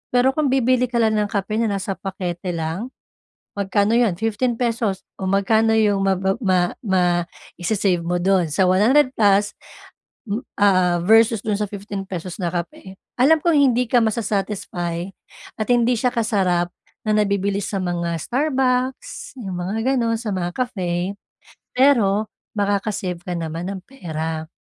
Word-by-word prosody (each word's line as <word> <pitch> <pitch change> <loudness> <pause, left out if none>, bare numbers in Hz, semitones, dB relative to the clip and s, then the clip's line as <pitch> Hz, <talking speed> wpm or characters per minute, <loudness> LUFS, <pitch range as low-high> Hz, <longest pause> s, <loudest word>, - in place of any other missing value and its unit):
Pero 250 +2 +4
kung 300 +1 0
bibili 255 -1 +2
ka 245 - -8
lang 220 -2 +3
ng 210 - +1
kape 205 +2 -2
na 220 -3 +1
nasa 195 0 -3
pakete 180 -2 -4
lang, 165 +7 -3 0.7
magkano 205 +2 +2
'yon, 225 -7 +2
15 225 +2 0
pesos 230 -5 -1 0.2
o 190 - -2
magkano 220 +3 +3
'yong 210 -2 +3
ma 195 0 +3 0.3
ma 185 -2 +3 0.3
ma 190 -3 +2 0.6
isi-save 185 -1 +1
mo 175 +1 -1
do'n, 185 -2 +2
sa 190 - +2
100 245 +9 +4
plus 205 -1 +3 1.1
ah, 185 -3 +4
versus 225 +2 +5
do'n 210 -2 0
sa - - +2
fifteen 200 -1 -6
pesos 180 -1 -5
na 175 -2 -1
kape. 175 +2 -5 0.3
Alam 310 +5 +6
kong 340 -3 +3
hindi 250 -3 +3
ka 245 - +5
masa-satisfy 195 -5 -2 0.5
at 215 - 0
hindi 245 0 +3
siya 250 - +1
kasarap 190 -6 +1 0.4
na - - +1
nabibili 200 -1 +1
sa 200 0 -3
mga 170 -1 -2
Starbucks, 260 - -1
'yung 190 -3 -5
mga 225 +9 -1
gano'n, 230 -2 +1
sa 225 -3 -3
mga 175 -1 -2
Cafe, 185 -6 -2 0.6
pero 220 -6 +4 0.3
makaka-save 200 -3 -1
ka 180 0 -4
naman 165 +3 -4
ng 195 - -6
pera. 160 -10 -5
205 Hz, 150 wpm, -21 LUFS, 185-230 Hz, 1.1 s, Alam